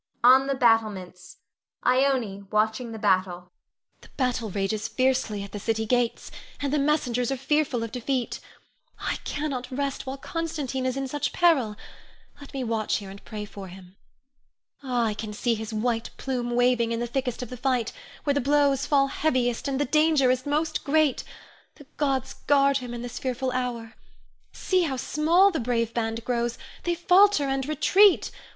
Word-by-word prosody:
[On 260 Hz, +2 st, +7 dB
the 275 Hz, -, 0 dB
battlements. 215 Hz, -7 st, 0 dB, 0.5 s
Ione, 250 Hz, -7 st, +1 dB
watching 220 Hz, +3 st, 0 dB
the 225 Hz, -, -6 dB
battle.] 185 Hz, -4 st, +1 dB
Ione. 180 Hz, 0 st, -19 dB, 0.5 s
The -, -, -15 dB
battle 250 Hz, -4 st, 0 dB
rages 205 Hz, +3 st, -2 dB
fiercely 255 Hz, -4 st, 0 dB
at 200 Hz, -, -9 dB
the 205 Hz, -, -5 dB
city 220 Hz, +1 st, -1 dB
gates, 245 Hz, +1 st, 0 dB, 0.3 s
and 285 Hz, 0 st, -2 dB
the 300 Hz, -, +2 dB
messengers 255 Hz, -5 st, +1 dB
are 270 Hz, -, -1 dB
fearful 270 Hz, -3 st, 0 dB
of 230 Hz, -, -5 dB
defeat. 250 Hz, 0 st, -2 dB, 0.6 s
I -, -, -2 dB
cannot 275 Hz, -4 st, -3 dB
rest 275 Hz, +1 st, -3 dB
while 265 Hz, +1 st, -4 dB
Constantine 285 Hz, -4 st, -3 dB
is 255 Hz, +1 st, -2 dB
in 270 Hz, 0 st, -2 dB
such 290 Hz, +2 st, -2 dB
peril. 280 Hz, -12 st, +3 dB, 0.6 s
Let 285 Hz, -, -12 dB
me 270 Hz, -2 st, -3 dB
watch 225 Hz, -2 st, -1 dB
here 200 Hz, -2 st, -8 dB
and 200 Hz, -, -12 dB
pray 210 Hz, -2 st, -6 dB
for 200 Hz, -2 st, -9 dB
him. 185 Hz, 0 st, -13 dB, 0.9 s
Ah, 250 Hz, -4 st, 0 dB
I 215 Hz, -, 0 dB
can 215 Hz, 0 st, -6 dB
see 235 Hz, +3 st, 0 dB
his 220 Hz, 0 st, -5 dB
white 225 Hz, +1 st, -1 dB
plume 250 Hz, -3 st, -3 dB
waving 245 Hz, -1 st, +2 dB
in 230 Hz, -, -1 dB
the 240 Hz, -, -1 dB
thickest 250 Hz, 0 st, -3 dB
of 250 Hz, -, -9 dB
the -, -, -5 dB
fight, 250 Hz, -2 st, 0 dB, 0.3 s
where 285 Hz, -, +1 dB
the 285 Hz, -, +1 dB
blows 280 Hz, 0 st, +2 dB
fall 275 Hz, -2 st, +4 dB
heaviest 255 Hz, -4 st, 0 dB
and 275 Hz, -1 st, -1 dB
the 290 Hz, -, +2 dB
danger 305 Hz, -2 st, +3 dB
is 255 Hz, +2 st, -2 dB
most 305 Hz, +2 st, -1 dB
great. 305 Hz, -1 st, +2 dB, 0.5 s
The 290 Hz, -, -15 dB
gods 270 Hz, -3 st, 0 dB
guard 280 Hz, -1 st, +4 dB
him 245 Hz, -2 st, -6 dB
in 240 Hz, -, -6 dB
this 245 Hz, -, -6 dB
fearful 255 Hz, 0 st, -2 dB
hour! 245 Hz, -3 st, -3 dB, 0.6 s
See 370 Hz, -1 st, 0 dB
how 300 Hz, -6 st, -1 dB
small 335 Hz, +9 st, +3 dB
the 325 Hz, -, -2 dB
brave 230 Hz, -1 st, -1 dB
band 225 Hz, 0 st, -2 dB
grows; 240 Hz, -1 st, -1 dB, 0.3 s
they 345 Hz, 0 st, +1 dB
falter 365 Hz, 0 st, +5 dB
and 270 Hz, 0 st, -1 dB
retreat. 380 Hz, +6 st, +4 dB
250 Hz, 175 wpm, -26 LUFS, 225-280 Hz, 0.9 s, On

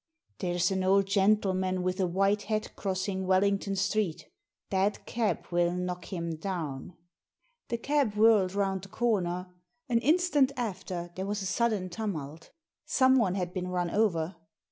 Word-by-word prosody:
There's 175 Hz, 0 st, 0 dB
an 190 Hz, -1 st, 0 dB
old 195 Hz, +1 st, +4 dB
gentleman 190 Hz, -2 st, +2 dB
with 185 Hz, +1 st, -1 dB
a 185 Hz, -, +2 dB
white 195 Hz, +3 st, +2 dB
hat 215 Hz, 0 st, -2 dB
cross 190 Hz, 0 st, -2 dB
ing 190 Hz, -1 st, -2 dB
Wellington 195 Hz, +1 st, +2 dB
Street 195 Hz, -3 st, -1 dB, 0.2 s
— -, -, -60 dB
that 195 Hz, +2 st, 0 dB
cab 230 Hz, -3 st, -1 dB
will 175 Hz, 0 st, +2 dB
knock 180 Hz, 0 st, -3 dB
him 170 Hz, -3 st, -4 dB
down!" 160 Hz, -4 st, -5 dB, 0.7 s
The 235 Hz, -, -2 dB
cab 270 Hz, -3 st, 0 dB
whirled 210 Hz, -3 st, +4 dB
round 195 Hz, -2 st, 0 dB
the 195 Hz, -, -11 dB
comer. 185 Hz, -6 st, -1 dB, 0.4 s
An 235 Hz, -1 st, +3 dB
instant 300 Hz, -2 st, +3 dB
after 185 Hz, -6 st, -4 dB
there 190 Hz, +1 st, -4 dB
was 205 Hz, -1 st, -2 dB
a -, -, -4 dB
sudden 205 Hz, -1 st, 0 dB
tumult 165 Hz, -7 st, -5 dB, 0.2 s
— -, -, -64 dB
someone 260 Hz, -8 st, +4 dB
had 180 Hz, -2 st, -3 dB
been 180 Hz, -1 st, -3 dB
run 180 Hz, -1 st, -1 dB
over. 185 Hz, -5 st, +1 dB
190 Hz, 160 wpm, -29 LUFS, 180-210 Hz, 0.7 s, old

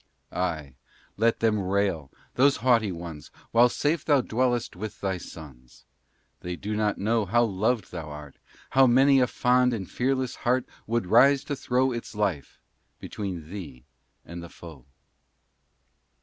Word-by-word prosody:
Ay, 80 Hz, -7 st, -3 dB, 0.4 s
let 115 Hz, +2 st, +1 dB
them 110 Hz, -2 st, +2 dB
rail 95 Hz, -6 st, -1 dB, 0.2 s
those 140 Hz, +2 st, +4 dB
haughty 115 Hz, -5 st, +3 dB
ones, 85 Hz, -3 st, -8 dB, 0.2 s
While 120 Hz, +2 st, +5 dB
safe 150 Hz, +4 st, 0 dB
thou 145 Hz, -3 st, +3 dB
dwellest 120 Hz, -1 st, -1 dB
with 105 Hz, +2 st, -7 dB
thy 95 Hz, -2 st, -2 dB
sons. 65 Hz, -8 st, -13 dB, 0.5 s
They 90 Hz, 0 st, -5 dB
do 105 Hz, +4 st, -4 dB
not 105 Hz, -1 st, 0 dB
know 110 Hz, +2 st, +1 dB
how 120 Hz, +5 st, +3 dB
loved 110 Hz, +1 st, -1 dB
thou 80 Hz, -4 st, -6 dB
art, 75 Hz, -1 st, -10 dB, 0.3 s
How 135 Hz, 0 st, +5 dB
many 135 Hz, +3 st, +5 dB
a 125 Hz, -, +3 dB
fond 125 Hz, 0 st, +2 dB
and 95 Hz, -5 st, -6 dB
fearless 130 Hz, 0 st, -1 dB
heart 125 Hz, +1 st, 0 dB, 0.2 s
Would 115 Hz, -2 st, 0 dB
rise 135 Hz, +8 st, +5 dB
to 145 Hz, -, -3 dB
throw 130 Hz, 0 st, +1 dB
Its 120 Hz, -2 st, -6 dB
life 100 Hz, -9 st, -2 dB, 0.4 s
between 90 Hz, -6 st, -6 dB
thee 75 Hz, -11 st, -8 dB, 0.4 s
and 85 Hz, 0 st, -8 dB
the 85 Hz, -, -9 dB
foe. 80 Hz, -9 st, -13 dB
105 Hz, 150 wpm, -26 LUFS, 85-125 Hz, 0.5 s, While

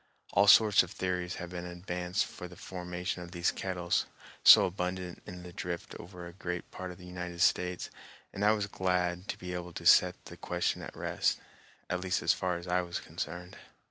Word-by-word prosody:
All 100 Hz, +1 st, +5 dB
sorts 105 Hz, -1 st, +8 dB
of 90 Hz, -, -4 dB
theories 90 Hz, -1 st, -2 dB
have 90 Hz, 0 st, -7 dB
been 90 Hz, 0 st, -5 dB
advanced 90 Hz, +1 st, -2 dB
for 90 Hz, -, -8 dB
the 90 Hz, -, -13 dB
formation 90 Hz, 0 st, -5 dB
of 85 Hz, +1 st, -9 dB
these 85 Hz, -1 st, +1 dB
kettles, 90 Hz, -2 st, -1 dB, 0.4 s
so -, -, +10 dB
abundant 90 Hz, -1 st, -3 dB
in 90 Hz, 0 st, -8 dB
the 90 Hz, -1 st, -10 dB
drift 85 Hz, -1 st, -5 dB
over 90 Hz, 0 st, -9 dB
a 85 Hz, -, -9 dB
great 90 Hz, -1 st, -5 dB
part 95 Hz, -, -6 dB
of 90 Hz, -, -9 dB
the 90 Hz, -, -12 dB
United 90 Hz, -1 st, -6 dB
States, 90 Hz, -1 st, +2 dB, 0.4 s
and 100 Hz, -, -3 dB
I 105 Hz, +1 st, +6 dB
was 105 Hz, -2 st, 0 dB
glad 90 Hz, -1 st, -1 dB
to -, -, -3 dB
be 90 Hz, 0 st, -6 dB
able 90 Hz, -1 st, -5 dB
to -, -, -7 dB
set -, -, +5 dB
the -, -, -10 dB
question -, -, -1 dB
at -, -, -8 dB
rest, -, -, 0 dB, 0.5 s
at 90 Hz, -, -1 dB
least 90 Hz, 0 st, -1 dB
as -, -, +4 dB
far 90 Hz, -2 st, -1 dB
as 85 Hz, +1 st, -9 dB
I 90 Hz, +1 st, +2 dB
was 85 Hz, -1 st, -4 dB
concerned. 90 Hz, +2 st, -6 dB
90 Hz, 205 wpm, -31 LUFS, -, 0.5 s, so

